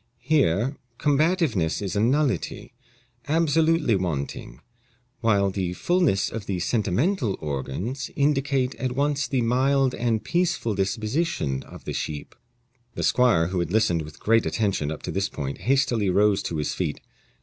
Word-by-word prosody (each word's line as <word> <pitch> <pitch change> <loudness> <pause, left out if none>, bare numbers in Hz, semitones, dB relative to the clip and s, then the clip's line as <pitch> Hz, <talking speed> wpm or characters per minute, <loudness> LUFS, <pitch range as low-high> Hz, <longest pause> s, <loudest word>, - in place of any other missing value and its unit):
Here 135 - +1 0.2
combativeness 145 - +1
is 100 -2 -4
a - - +1
nullity 125 - 0 0.5
absolutely 160 -4 +2
wanting 70 -8 -3 0.6
while 100 -4 +2
the 95 -2 -2
fullness 170 - +1
of 110 -2 -6
the 95 - -1
sentimental 110 - 0
organs 80 - -4
indicate 135 -2 +1
at 130 -1 -2
once 145 +1 0
the 130 -3 0
mild 130 +2 +2
and 115 -2 -1
peaceful 175 -10 0
disposition 105 - -1
of - - -13
the - - -4
sheep." 75 -2 -4 0.6
The - - -3
squire, 105 -10 +3
who 90 -1 -1
had 85 -1 -2
listened 105 -6 +2
with 75 -1 -10
great 115 +1 +3
attention 100 -9 0
up 80 - -7
to - - -4
this 100 +1 -1
point, 70 -1 -5
hastily 120 -6 +1
rose 100 +1 +3
to 80 - -3
his 75 - -1
feet. - - -2
115 Hz, 145 wpm, -25 LUFS, 95-140 Hz, 0.6 s, squire